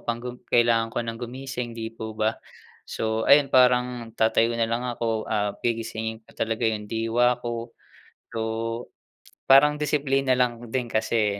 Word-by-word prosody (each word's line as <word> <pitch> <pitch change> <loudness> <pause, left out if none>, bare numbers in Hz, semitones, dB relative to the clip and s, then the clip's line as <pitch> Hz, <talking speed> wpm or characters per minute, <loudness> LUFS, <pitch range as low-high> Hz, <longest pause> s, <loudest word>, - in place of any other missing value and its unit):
pang 120 0 -1
gu 125 - -4 0.2
kailangan 115 -1 +3
ko - - -1
nang 115 0 -5
gumising, 125 -1 -5
'di 115 0 -4
po 110 -1 -7
ba. 110 +1 0 0.5
So 110 0 -2
ayun 140 -1 +6
parang 125 -2 +3
tatayo 115 +1 +2
na 115 - +2
lang 120 +2 -1
ako, 115 -2 -2
ah, 105 -1 0
gigisingin 110 -1 -3
ko - - -20
talaga 115 +1 -1
yung 110 -2 -1
diwa 115 +2 +2
ko. 120 0 -5 0.6
So, 115 - -5 1.1
parang 150 +2 +6
disiplina 135 -3 +1
lang 120 -2 0
din 125 +1 -1
kasi 110 -2 +1
115 Hz, 155 wpm, -25 LUFS, 110-125 Hz, 1.1 s, ayun